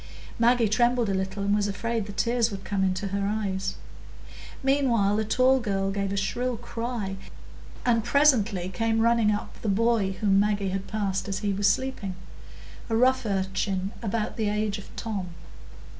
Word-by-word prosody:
Maggie 235 0 +4
trembled 240 +1 +2
a - - +1
little, 190 +1 -2
and 200 0 +1
was 205 0 +2
afraid 220 +1 -2
the - - -6
tears 235 +3 +1
would 195 -2 -7
come 195 -1 -1
into 190 +1 -1
her 200 +1 -1
eyes. 200 -3 -2 0.9
Meanwhile 250 -7 +2
the 220 - +1
tall 255 +4 +3
girl 195 -4 -1
gave 195 0 -2
a 200 - -2
shrill 240 +5 -1
cry, 230 -4 -4 0.7
and 230 -2 +3
presently 225 -11 +3
came 225 +4 0
running 230 -2 +3
up 210 0 -4
the 215 - -1
boy 215 -1 +2
whom 195 0 +2
Maggie 205 -1 +1
had 195 +1 -3
passed 200 -2 -2
as 195 -1 -2
he 200 - +1
was 200 +1 +2
sleeping,—a 185 - -6
rough 255 0 +3
urchin 195 0 -1
about 220 -1 -2
the 215 -2 0
age 210 0 -1
of 200 - -12
Tom. 195 -6 -4
205 Hz, 165 wpm, -26 LUFS, 195-230 Hz, 0.9 s, Maggie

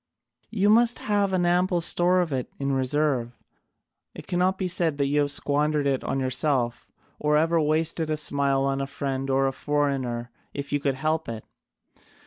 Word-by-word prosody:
You 205 -2 +2
must 235 +2 +5
have 205 -2 0
an 180 -2 +1
ample 180 +1 +2
store 175 +2 +3
of 165 -5 -2
it 130 -2 -3
in 140 0 -2
reserve: 130 -2 0 0.8
it - - -9
cannot 180 +2 0
be 190 - -2
said 165 -4 0
you 140 +1 +1
have 145 -1 +1
squandered 145 +1 0
it 135 -2 0
on 135 - -2
yourself, 130 -2 0 0.3
or 150 0 +2
ever 165 +1 +2
wasted 155 +1 0
a 155 - 0
smile 140 -2 +1
on 135 0 -1
friend 135 -1 -4
or 135 0 +2
foreigner 135 -4 -2 0.2
if 140 0 -5
you 145 - +2
could 140 -2 -1
help 155 +2 -1
it. 110 -2 -7
145 Hz, 165 wpm, -25 LUFS, 135-170 Hz, 0.8 s, must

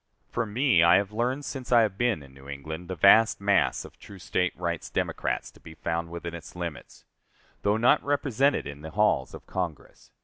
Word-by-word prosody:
For 115 - -1
me, 120 - +3
I 85 +1 +6
have 100 +1 +1
learned 125 +6 -1
since 130 -3 -6
I 120 -1 +7
have 105 -3 -1
been 115 -8 0
in 70 -1 -16
New 70 +1 -14
England 80 +5 -7
the 95 - -4
vast 105 +6 +6
mass 100 -1 +2
of - - -15
true 100 - -12
State 90 0 -1
rights 85 -2 -3
Democrats - - -2
to - - -20
be 80 -1 -12
found 85 +1 -3
within 85 0 -6
its 85 +1 -10
limits 85 -4 -7 0.6
though 105 +1 +2
not 125 +6 +4
represented 140 -1 +1
in 70 0 -8
the 80 - -7
halls 90 -8 +1
of - - -12
Congress. 90 -5 -6
95 Hz, 200 wpm, -27 LUFS, 85-115 Hz, 0.6 s, I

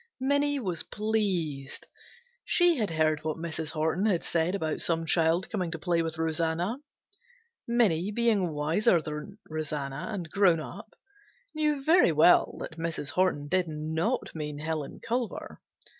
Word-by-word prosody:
Minnie 285 +2 +1
was 180 -9 -2
pleased. 185 -11 -2 0.6
She 350 -2 +4
had 215 -4 +1
heard 155 -1 +1
what 155 0 -2
Mrs. 160 -1 -4
Horton 160 +6 0
had 185 -6 +1
said 170 +3 0
about 160 -5 -2
some 165 -1 0
child 165 +2 +2
coming 185 -5 -1
to 165 - -3
play 170 0 0
with 160 -1 -3
Rosanna. 165 +6 0 0.9
Minnie 205 -7 +2
being 210 -4 +2
wiser 165 +7 +2
than 155 +6 -7
Rosanna 150 0 -4
and 185 -6 -4
grown 190 -5 +4
up, 200 +7 -9 0.6
knew 300 -3 0
very 325 - +5
well 160 +3 +5
that 160 - -7
Mrs. 165 -3 -3
Horton 180 -6 +1
did 180 +2 +1
not 160 +9 -2
mean 150 -2 -5
Helen 155 -1 -4
Culver. 240 0 -3
170 Hz, 145 wpm, -28 LUFS, 155-210 Hz, 0.9 s, very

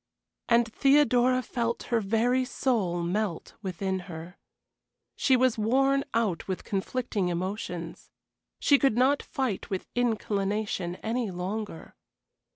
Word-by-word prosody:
And 235 0 +4
Theodora 255 -3 +4
felt 235 -1 -2
her 230 - +4
very 230 +5 +2
soul 215 -10 0
melt 185 0 -2
within 190 0 -2
her. 165 +2 -8 0.8
She 265 -2 +3
was 250 -3 +2
worn 270 +5 +3
out 215 -7 0
with 190 -1 -3
conflicting 205 0 -2
emotions. 180 -1 -4 0.5
She 285 -2 +4
could 270 -5 +2
not 270 +3 +4
fight 255 -8 -3
with 190 -2 -3
inclination 205 -5 -1
any 230 0 -1
longer. 185 0 -5
220 Hz, 115 wpm, -28 LUFS, 190-250 Hz, 0.8 s, And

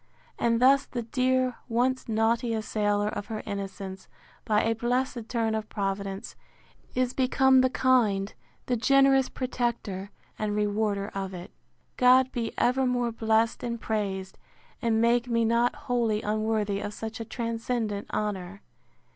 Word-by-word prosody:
And 230 -1 +2
thus 275 +2 +5
the 240 -2 -4
dear, 255 +1 +1
once 250 +2 0
naughty 225 +1 +1
assailer 210 -1 0
of 205 - -5
her 220 -2 -5
innocence, 195 -2 -6 0.4
by 210 -1 +2
a 225 - +2
blessed 240 0 -1
turn 225 -2 0
of 220 -1 -3
Providence, 195 -1 -3 0.6
is 255 0 +1
become 265 0 +4
the 260 - +3
kind, 230 -7 +2 0.3
the 250 - 0
generous 270 +2 +4
protector 235 -6 -3 0.3
and 210 -1 -1
rewarder 205 -1 0
of 195 -1 -5
it. 175 0 -9 0.5
God 255 0 +5
be 230 -2 -2
evermore 250 -1 +1
blessed 225 0 +1
and 235 -1 -3
praised! 195 -4 -3 0.4
and 225 -1 +2
make 235 +1 +3
me 230 -1 +1
not 235 +2 +2
wholly 230 -3 0
unworthy 215 -1 0
of 205 +1 -5
such 225 0 -6
a - - -3
transcendent 230 -2 -3
honour! 200 -2 -3
225 Hz, 140 wpm, -27 LUFS, 210-245 Hz, 0.6 s, thus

